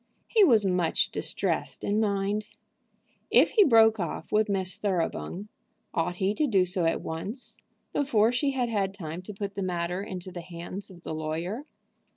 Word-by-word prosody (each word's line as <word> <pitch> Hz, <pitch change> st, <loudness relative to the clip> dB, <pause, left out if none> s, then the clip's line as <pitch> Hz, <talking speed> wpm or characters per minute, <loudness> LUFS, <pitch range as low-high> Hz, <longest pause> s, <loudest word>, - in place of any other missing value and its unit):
He 440 Hz, -3 st, +5 dB
was 225 Hz, -, +5 dB
much 180 Hz, -3 st, +1 dB
distressed -, -, -1 dB
in 205 Hz, +1 st, +1 dB
mind. 205 Hz, 0 st, 0 dB, 0.8 s
If -, -, +5 dB
he 425 Hz, -, +6 dB
broke 225 Hz, -, +6 dB
off 170 Hz, -1 st, -4 dB
with 215 Hz, 0 st, +3 dB
Miss 190 Hz, -2 st, -1 dB
Thoroughbung, 185 Hz, -, -2 dB, 0.5 s
ought 175 Hz, +2 st, 0 dB
he 190 Hz, +2 st, +1 dB
to 300 Hz, +7 st, +1 dB
do 195 Hz, -7 st, +3 dB
so 180 Hz, -1 st, -1 dB
at 165 Hz, -, +1 dB
once, 195 Hz, +11 st, -5 dB, 0.4 s
before 230 Hz, -5 st, +3 dB
she 275 Hz, +3 st, +1 dB
had 260 Hz, -3 st, 0 dB
had 200 Hz, -4 st, -1 dB
time 165 Hz, -2 st, -6 dB
to 185 Hz, -, -8 dB
put 200 Hz, 0 st, -4 dB
the 200 Hz, -, -4 dB
matter 180 Hz, 0 st, -2 dB
into 185 Hz, -2 st, -6 dB
the 175 Hz, -1 st, -6 dB
hands 175 Hz, +3 st, -8 dB
of 175 Hz, -2 st, -14 dB
the -, -, -4 dB
lawyer? 165 Hz, -, -3 dB
195 Hz, 175 wpm, -28 LUFS, 175-215 Hz, 0.8 s, he